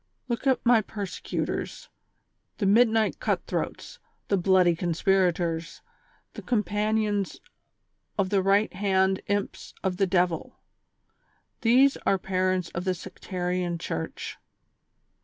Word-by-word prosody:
Look 240 +2 -2
at 260 -1 +2
my 235 -2 +6
persecu 205 -2 -4
tors, - - -5 0.7
the 205 - -1
midnight 220 +1 +3
cut - - -1
throats, - - -4 0.3
the 200 - +3
bloody 185 -2 +4
conspiratoi 175 -1 +1
s, 165 - -14 0.5
the - - -8
companions 210 -2 0 0.8
of 195 -2 0
the 200 -2 +3
right 200 +3 +2
hand 190 0 +1
imps 205 -1 -3
of 185 -1 -1
the 195 -1 +2
devil. 175 -2 0 1.0
These 255 +4 +5
are 195 - +1
parents 185 -2 0
of 175 - -4
the 185 -1 0
sectarian 180 0 -3
Church. 80 - -5
190 Hz, 120 wpm, -27 LUFS, 180-210 Hz, 1.0 s, my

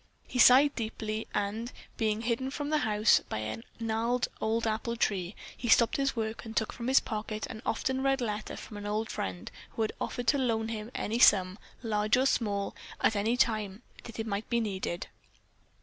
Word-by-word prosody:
He 250 - -3
sighed 275 +4 +8
deeply, 220 -1 -4
and, 210 +4 -2 0.2
being 215 -1 0
hidden 240 +3 -1
from 290 +2 -4
the 305 - +3
house 215 -4 +4
by - - -2
a 110 +1 -4 0.2
gnarled 230 +2 0
old 225 +1 0
apple 225 +2 -1
tree, 195 -4 -1 0.2
he 240 - -5
stopped 235 0 +5
his 275 -1 0
work 220 -1 -3
and 225 -1 -7
took 220 - 0
from 235 - -5
his 265 +1 +6
pocket 215 -1 -4
an 220 - -8
often 260 +4 0
read 270 0 +2
letter 215 -3 -3
from 210 - -9
an 205 0 -6
old 215 +2 -1
friend 95 -1 -4 0.2
who 225 - +1
had 215 - -1
offered 245 - -3
to 280 - +3
loan 225 -3 0
him 220 -1 -5
any 225 +3 -1
sum, 190 -4 +5 0.2
large 215 0 +2
or 260 - +3
small, 205 -6 0 0.2
at 220 - +2
any 220 +4 +1
time 215 -4 0 0.2
that 230 - -9
it 220 - -1
might 205 -1 -3
be 235 - +2
needed. 190 -5 -3
220 Hz, 195 wpm, -30 LUFS, 210-240 Hz, 0.2 s, sighed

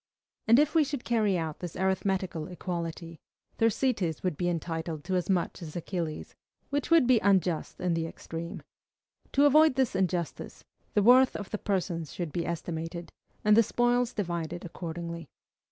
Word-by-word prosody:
And 230 +2 +7
if 300 +1 +3
we 325 -2 +5
should 280 -3 -4
carry 215 -5 +2
out 160 -3 -4
this 175 -2 -6
arithmetical 190 -3 -1
equality, 170 -2 -5 0.4
Thersites 225 - +1
would 180 -4 0
be 175 +4 -1
entitled 165 -2 -3
to 185 +3 -2
as 180 0 -1
much 180 -2 0
as 155 -3 -8
Achilles, 170 -2 -4 0.4
which 285 0 -1
would 330 -5 +6
be 250 -2 +5
unjust 185 -5 +1
in 180 -1 0
the 165 0 -1
extreme. 165 +1 -7 0.7
To 280 +1 +5
avoid 305 0 +6
this 260 -6 +1
injustice, 180 -3 -2 0.3
the 205 - +4
worth 255 +3 +6
of 205 - -6
the 210 - -2
persons 175 -6 -2
should 170 -4 -4
be 170 +1 -2
estimated, 170 0 -4 0.3
and 210 0 +6
the 230 - +7
spoils 240 +2 +1
divided 175 -3 -3
accordingly. 170 -2 -6
180 Hz, 160 wpm, -29 LUFS, 170-225 Hz, 0.7 s, And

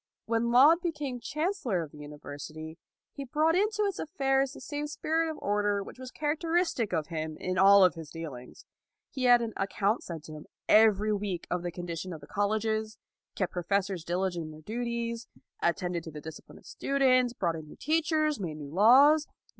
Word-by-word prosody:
When 230 +1 0
Laud 290 +8 +6
became 300 -7 -3
Chancellor 280 - -2
of 150 - -10
the 150 - -14
University 150 +2 -9 0.3
he 280 - -7
brought 310 +5 +1
into 420 +2 +1
its 395 -3 -2
affairs 270 -4 0
the - - -11
same 290 +2 -4
spirit 320 +2 -1
of 315 - -5
order 205 0 0
which 250 - -12
was 255 -1 -7
character 310 +4 -3
istic 340 - +1
of 160 -3 -1
him 155 -1 -4
in 185 0 -2
all 195 0 +8
his 165 -3 -8
dealings. 145 -7 -9 0.5
He 260 -2 -2
had 245 -1 +6
an 225 -1 -4
account 200 +2 0
sent 165 -3 -8
him 155 -1 -10 0.2
every 215 -1 +5
week 200 -4 -3
of 180 - 0
the 175 0 -4
condition 175 +1 -5
of 160 - -8
the - - -11
colleges, 215 +3 -1 0.4
kept 185 -3 -2
professors 190 0 -1
diligent 175 -1 -2
in 155 - -8
their 155 0 -12
duties, 235 +3 -3 0.3
attended 175 -1 -1
to 160 - -7
the 150 - -8
dis 160 +1 -8
cipline - - -16
of - - -18
students, 255 -3 +2
brought 170 -8 -1
in 160 -1 -8
new - - -12
teach 315 +3 0
ers, 310 -3 +1
made 165 -6 -4
new 145 -1 -9
laws. 275 - +6
210 Hz, 190 wpm, -29 LUFS, 170-275 Hz, 0.5 s, all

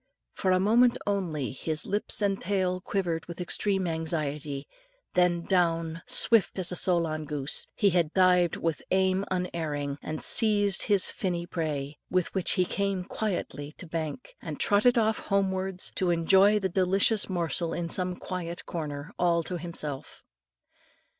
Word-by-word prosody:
For 190 - -1
a 185 0 +4
moment 235 +5 +4
only 175 -9 -2
his 155 +3 -2
lips 205 +1 -2
and 195 -1 0
tail 185 -1 -1
quivered 175 -4 -2
with 170 0 -8
extreme 190 +2 0
anxiety, 150 -4 -3 0.5
then 175 -1 +2
down, 165 -3 0
swift 225 -4 +3
as 185 -2 +1
Solan 170 -4 0
goose, 145 -1 -2
he 200 -2 +3
had 170 -3 +1
dived 180 -2 +4
with 165 -2 -2
aim 190 +1 +2
unerring, 155 -6 -3
and 155 0 -5
seized 205 -3 +4
his 200 -3 +6
finny 175 -5 -3
prey, 150 -4 -4
with 185 -1 0
which 190 -3 +1
he 185 -2 +2
came 195 0 -2
quietly 155 -8 -4
to - - -10
bank, 165 - -5
and - - -6
trotted 220 +4 +3
off 220 -1 +2
homewards, 190 -1 -1
to 185 - 0
enjoy 190 +5 +4
the 195 -2 0
delicious 190 +4 +2
morsel 170 -2 -2
in 170 0 -3
some 180 +1 -2
quiet 175 -2 -6
corner 150 -3 -6
all 170 -1 +2
to 180 +1 -4
himself. 155 -5 -6
180 Hz, 145 wpm, -28 LUFS, 165-195 Hz, 0.5 s, his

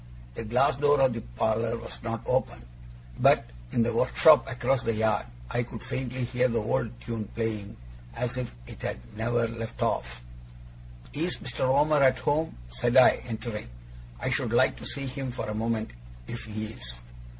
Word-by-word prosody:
The 115 - -6
glass 125 +3 +3
door 145 0 +4
of 135 -2 +4
the 115 - -4
parlour 110 - 0
was 115 - -8
not 115 -1 -3
open; 60 -1 0 0.5
but - - +5 0.2
in 115 - +3
the 120 +1 0
workshop 130 +6 +5
across 125 +1 +1
the 115 -1 0
yard 110 - +1 0.2
I 120 - +1
could 115 -2 -7
faintly 130 0 -3
hear 125 +1 +2
the 115 -2 -1
old 115 +1 -1
tune 115 -2 -4
playing, 110 -3 -3 0.4
as 125 0 -2
if 125 -2 -3
it - - -11
had - - -2 0.2
never 115 +1 +1
left 115 0 -4
off. - - -2 0.9
'Is 170 +5 -1
Mr. 130 +1 -3
Omer 145 +2 +4
at 130 -1 +5
home?' 145 - 0
said 120 - +1
I, 130 - +7
entering. 110 - -5 0.5
'I - - -1
should - - 0
like - - +4
to - - -7
see 140 -1 -4
him, 135 0 -4
for 120 - -4
a 105 - -2
moment, 110 0 -1 0.3
if 120 - -6
he 110 0 -4
is. - - -5
115 Hz, 175 wpm, -28 LUFS, 110-130 Hz, 0.9 s, I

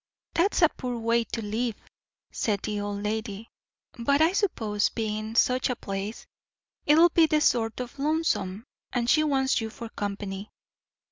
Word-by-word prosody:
"That's 360 +1 +2
a 325 - +7
poor 250 -5 -5
way 230 0 +1
to 225 - -4
live," 225 +2 -1 0.6
said 205 -3 -1
the 210 -1 -2
old 205 0 -4
lady. 215 0 -3 0.5
"But 280 +5 +2
I 320 +2 +5
suppose, 220 - +1
bein' 215 0 -3
such 255 +2 +3
a 250 - 0
place, 195 +1 -5 0.6
it'll 325 +4 +7
be 325 -1 +4
sort 225 -6 +1
o' 250 - -3
lonesome, 280 - 0 0.3
and 240 -2 -1
she 310 +5 +4
wants 265 -4 +2
you 220 - -3
for 230 +1 -8
company. 200 -1 -5
230 Hz, 150 wpm, -27 LUFS, 210-270 Hz, 0.6 s, a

